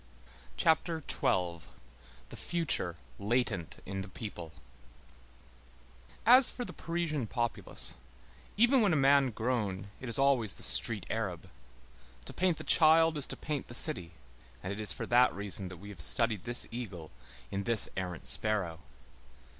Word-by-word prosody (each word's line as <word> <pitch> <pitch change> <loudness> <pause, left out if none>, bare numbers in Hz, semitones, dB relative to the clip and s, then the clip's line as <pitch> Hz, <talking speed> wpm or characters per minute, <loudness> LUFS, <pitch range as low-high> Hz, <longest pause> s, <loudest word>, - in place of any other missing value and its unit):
CHAPTER 165 0 0
XII—THE 65 -8 -5
FUTURE 160 - -2 0.2
LATENT 105 -5 -3
IN 95 0 -6
THE 95 - -8
PEOPLE 90 -4 -9 1.7
As 250 +3 +7
for 245 - -6
the - - -9
Parisian 165 -7 -4
populace, 120 0 -1 0.6
even 240 +4 +3
when 200 -5 +2
a - - +2
man 140 -1 +3
grown, 105 -5 -4
it 125 - -8
is 115 - +3
always 135 -7 +1
the - - -10
street 110 -3 0
Arab; 100 -7 -5 0.7
to - - -10
paint 180 -3 -1
the - - -7
child 160 0 +4
is 145 -2 +3
to - - -4
paint 150 -3 -5
the 120 - -5
city; 90 - +1 0.5
and 95 +2 -5
it 100 - -9
is 110 - +3
for - - -5
that 125 -2 +2
reason 100 -1 0
that 90 - -11
we 100 +4 -12
have 95 -7 -8
studied 110 +4 +2
this 120 0 0
eagle 100 -10 -8 0.4
in 100 0 -4
this 115 -3 +2
arrant 90 -3 -6
sparrow. 100 -7 +7
115 Hz, 145 wpm, -30 LUFS, 95-145 Hz, 1.7 s, As